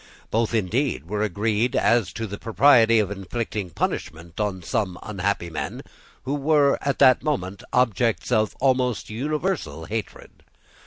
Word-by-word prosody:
Both, 115 +1 +1
indeed, 115 - 0
were 105 +2 -2
agreed 110 +3 0
as 115 -5 +2
to 115 - -4
the 100 -1 -7
propriety 115 -1 +5
of 105 -2 +1
inflicting 100 0 -4
punishment 80 +1 -4
on 100 -4 -2
some 100 -4 -2
unhappy 100 -4 -2
men 80 - -5 0.4
who 135 - -2
were, 145 -1 +3
at 140 -1 -1
that 130 -3 +6
moment, 100 - -2
objects 120 -1 +1
of 110 -3 +1
almost 125 -4 +1
universal 145 - -2
hatred. 110 -1 -7
110 Hz, 140 wpm, -24 LUFS, 100-125 Hz, 0.4 s, that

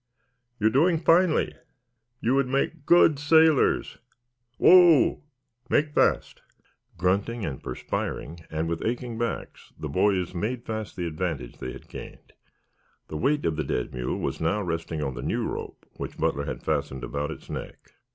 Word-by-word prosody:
You're 110 +1 +3
doing 165 +7 +4
finely. 165 +1 +3 0.7
You 120 - +2
would 135 -1 +2
make 140 +3 -1
good 165 -4 +6
sailors. 160 0 +3 0.6
Whoa! 175 -5 +6 0.5
Make 150 0 +2
fast." - - +1 0.6
Grunting 100 +6 0
and 65 - -5
perspiring, 75 +5 -4
and 80 +1 -2
with 85 0 -3
aching 120 0 -3
backs, 120 -1 -4
the 75 - -5
boys 90 +3 +1
made 115 +7 -3
fast 110 -1 -5
the 90 - -3
advantage 80 -6 -4
they 65 - -5
had - - -12
gained. - - -11 0.8
The 75 - -4
weight 145 - +1
of 80 -2 0
the 80 - 0
dead 60 -3 -3
mule 60 0 -2
was - - -3
now 100 +6 +1
resting 80 -3 -3
on 65 - -2
the - - -6
new - - -1
rope - - -6
which - - -6
Butler 70 0 0
had - - -5
fastened 65 -1 -2
about 70 +4 -3
its 80 - -9
neck. - - -8
105 Hz, 155 wpm, -26 LUFS, -, 0.8 s, good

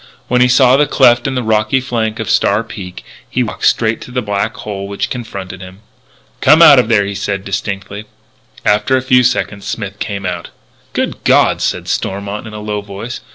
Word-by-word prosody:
When 125 0 +2
he 125 - +6
saw 125 +1 +5
the 145 +1 +3
cleft 120 -3 +4
in 135 - -2
the 125 - -1
rocky 110 +4 +1
flank 115 -4 -2
of 110 - -4
Star 100 +3 +2
Peak, 95 -5 -9 0.3
he - - 0
walked - - -1
straight 115 -1 +1
to - - -10
the 125 0 -2
black 105 +1 -2
hole 100 -2 -6
which 100 0 -3
confronted 100 -6 -6
him. 95 +2 -12 0.6
"Come 155 +4 +6
out 150 -5 +9
of 125 - +2
there," 105 -3 +3
he 100 - -4
said 100 0 -3
distinctly. 100 +1 -4 0.6
After 105 +6 +2
a 130 - -2
few 130 -1 +4
seconds 120 -5 -1
Smith 100 -3 -5
came 100 -2 -4
out. 90 -1 -4 0.4
"Good - - -3
God!" - - +3
said - - -2
Stormont 100 +3 -3
in 110 - -10
a - - -6
low 105 -1 -3
voice. 100 +5 -7
105 Hz, 200 wpm, -15 LUFS, 100-125 Hz, 0.6 s, out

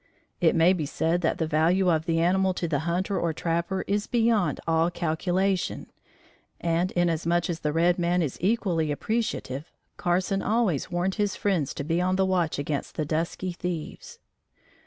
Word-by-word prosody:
It 165 -2 +3
may 170 +2 +5
be 160 -6 -2
said 165 +4 0
that 165 - 0
the 165 - 0
value 165 +4 +2
of 160 -1 0
the 165 -1 +1
animal 185 +2 +2
to 170 - -2
the 150 -3 0
hunter 185 +3 0
or 170 -1 0
trapper 170 +4 -1
is 205 +1 -1
beyond 225 - +2
all 165 +1 +3
calculation, 180 +3 -1 0.7
and, 170 +2 0
inasmuch 175 0 +1
as 165 - -4
the 150 - -1
red 175 +3 +2
man 175 0 +2
is 145 - -4
equally 180 -6 +1
appreciative, 160 - -3 0.3
Carson 185 +2 0
always 210 - 0
warned 180 +2 0
his 205 -2 0
friends 180 -9 0
to - - -3
be 165 +4 0
on 185 +1 +1
the 190 0 +2
watch 180 -4 0
against 145 0 -3
the 155 - -1
dusky 165 +4 -2
thieves. 175 -2 -6
175 Hz, 170 wpm, -26 LUFS, 160-185 Hz, 0.7 s, may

